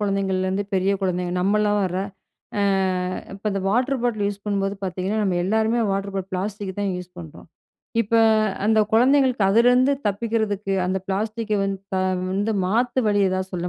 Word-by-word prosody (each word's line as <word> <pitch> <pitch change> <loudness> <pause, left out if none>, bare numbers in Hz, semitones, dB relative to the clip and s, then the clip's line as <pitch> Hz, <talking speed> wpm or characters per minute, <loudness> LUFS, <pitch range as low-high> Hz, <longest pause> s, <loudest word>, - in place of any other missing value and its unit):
குழந்தைங்கலேருந்து 195 -1 0
பெரிய 190 +1 +2
குழந்தைங்க, 180 -1 -1
நம்மள்ளோர. 205 -1 +1 0.7
ஆ, - - +2 0.7
இப்ப 200 +2 -14
அந்த 195 - -2
வாட்டர் 250 +5 +1
பாட்டில் 215 -4 0
யூஸ் 200 0 -7
பண்ணும்போது 200 -1 -1
பார்த்தீங்கன்னா, 190 +3 -2
நம்ம 185 -3 0
எல்லாருமே 220 +3 +1
வாட்டர் 195 0 -3
பாட்டில் 195 0 -4
பிளாஸ்டிக் 195 0 -4
தான் 200 -2 0
யூஸ் 180 0 -8
பண்றோம். 160 -3 -11 0.6
இப்ப, 230 +1 -3 0.5
அந்த 220 0 +4
குழந்தைங்களுக்கு, 255 -1 +4
அதுலேருந்து 245 +5 +4 0.2
தப்பிக்கிறதுக்கு, 205 -2 -1
அந்த 190 +1 0
பிளாஸ்டிக்கை 215 +2 -1
வந்து, 195 -1 -2 0.2
த - - +1 0.4
வந்து 205 +3 0
மாத்து 240 +6 +1
வழி 205 -1 +2
எதாவது 185 0 -2
சொல்ல 180 0 -2
200 Hz, 150 wpm, -23 LUFS, 190-220 Hz, 0.7 s, அந்த